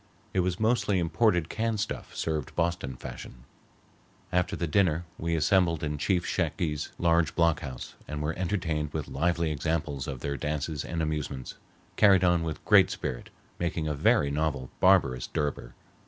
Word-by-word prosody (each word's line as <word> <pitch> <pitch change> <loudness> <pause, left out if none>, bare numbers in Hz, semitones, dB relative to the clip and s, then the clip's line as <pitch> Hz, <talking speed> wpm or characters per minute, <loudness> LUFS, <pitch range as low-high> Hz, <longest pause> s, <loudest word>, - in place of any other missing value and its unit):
It 95 - +1
was 90 -1 0
mostly 110 -3 +2
imported 90 0 +2
canned 110 +1 -1
stuff 105 - -4
served 80 -4 -2
Boston 85 -6 -1
fashion. - - -9 0.9
After 90 0 +1
the 85 - -2
dinner 85 0 +2
we 85 0 0
assembled 85 0 +2
in 75 -1 -2
Chief 90 +2 +1
Shakes's 80 -3 -1
large 85 -4 +2
block 85 -2 +3
house 65 -3 -7
and 75 0 -4
were 75 +2 -1
entertained 80 -5 -2
with 75 -3 -3
lively 85 +2 0
examples 75 -3 -2
of 65 -3 -5
their 70 -1 -2
dances 75 +1 -2
and 85 -1 -2
amusements, 75 -4 -3 0.4
carried 95 -3 +6
on 85 -2 +4
with 80 -2 -5
great - - +6
spirit, - - -4 0.3
making 85 -2 -1
a 75 - 0
very 70 0 +3
novel 70 -3 -1
barbarous 75 -10 +4
durbar. 70 -5 -3
80 Hz, 155 wpm, -28 LUFS, 75-90 Hz, 0.9 s, carried